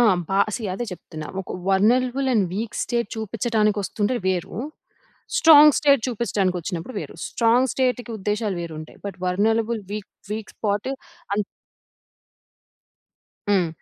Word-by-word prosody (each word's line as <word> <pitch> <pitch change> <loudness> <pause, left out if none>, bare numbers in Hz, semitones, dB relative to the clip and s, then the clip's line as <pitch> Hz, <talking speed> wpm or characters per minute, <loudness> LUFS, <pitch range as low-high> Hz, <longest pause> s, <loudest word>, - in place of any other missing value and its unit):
ఆ! - - +6 0.3
బా 195 - +2 0.2
సీ 240 - -7
అదే 240 - -3
చెప్తున్నా. 155 -3 -8 0.2
ఒక - - -12 0.2
వల్నలబుల్ 250 +7 +3
అండ్ 200 -4 +3
వీక్ 215 +2 -3
స్టేట్ 235 -3 -1
చూపిచ్చటానికొస్తుంటే 215 0 0
వేరు. 180 -1 -1 0.8
స్ట్రాంగ్ 300 -2 +8
స్టేట్ 280 -3 +4
చూపిచ్చటానికొచ్చినప్పుడు 190 -4 -2
వేరు. - - -7
స్ట్రాంగ్ 240 +3 +3
స్టేట్‌కి 250 -2 0
ఉద్దేశాలు 210 -1 -1
వేరుంటాయి, 155 -2 -8
but 195 -2 -6
vulnerable 220 +4 +1
week 210 -2 -5 0.2
week 215 -1 -5
spot 205 +3 -1 0.4
అన్ 210 - +1 2.1
హ్మ్. 190 -4 +3
215 Hz, 115 wpm, -23 LUFS, 190-240 Hz, 2.1 s, స్ట్రాంగ్